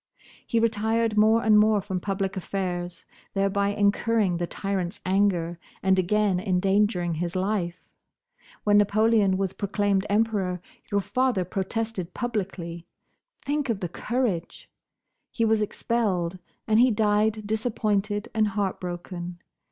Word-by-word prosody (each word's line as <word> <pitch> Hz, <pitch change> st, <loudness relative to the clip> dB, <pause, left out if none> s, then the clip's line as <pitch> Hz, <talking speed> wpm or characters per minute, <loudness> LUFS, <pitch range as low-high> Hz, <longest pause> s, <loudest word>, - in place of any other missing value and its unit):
He 230 Hz, -, +2 dB
retired 225 Hz, 0 st, +1 dB
more 220 Hz, +2 st, +4 dB
and 215 Hz, -1 st, +6 dB
more 215 Hz, 0 st, +4 dB
from 190 Hz, -1 st, -3 dB
public 195 Hz, 0 st, -2 dB
affairs, 180 Hz, -2 st, -4 dB, 0.3 s
thereby 195 Hz, +1 st, +1 dB
incurring 205 Hz, -1 st, +1 dB
the 175 Hz, 0 st, -2 dB
tyrant's 190 Hz, -2 st, -3 dB
anger 180 Hz, -3 st, +1 dB, 0.2 s
and 190 Hz, -1 st, +3 dB
again 195 Hz, 0 st, +2 dB
endangering 185 Hz, -1 st, +1 dB
his 170 Hz, +2 st, -3 dB
life. 185 Hz, -2 st, -2 dB, 0.8 s
When 205 Hz, 0 st, +5 dB
Napoleon 210 Hz, -1 st, +3 dB
was 195 Hz, -1 st, -1 dB
proclaimed 200 Hz, -1 st, 0 dB
Emperor 205 Hz, -4 st, +1 dB, 0.3 s
your 200 Hz, 0 st, +2 dB
father 250 Hz, -4 st, 0 dB
protested 190 Hz, -1 st, -3 dB
publicly—think 215 Hz, -, -5 dB
of 220 Hz, -4 st, 0 dB
the 180 Hz, -4 st, -3 dB
courage! 210 Hz, -4 st, -3 dB, 0.6 s
He 230 Hz, -, 0 dB
was 220 Hz, -1 st, +2 dB
expelled, 195 Hz, -5 st, -1 dB, 0.3 s
and 220 Hz, 0 st, +4 dB
he 250 Hz, +2 st, +6 dB
died 215 Hz, 0 st, +1 dB
disappointed 210 Hz, -1 st, -1 dB
and 220 Hz, -2 st, +2 dB
heartbroken. 180 Hz, -3 st, -4 dB
200 Hz, 120 wpm, -26 LUFS, 185-220 Hz, 0.8 s, and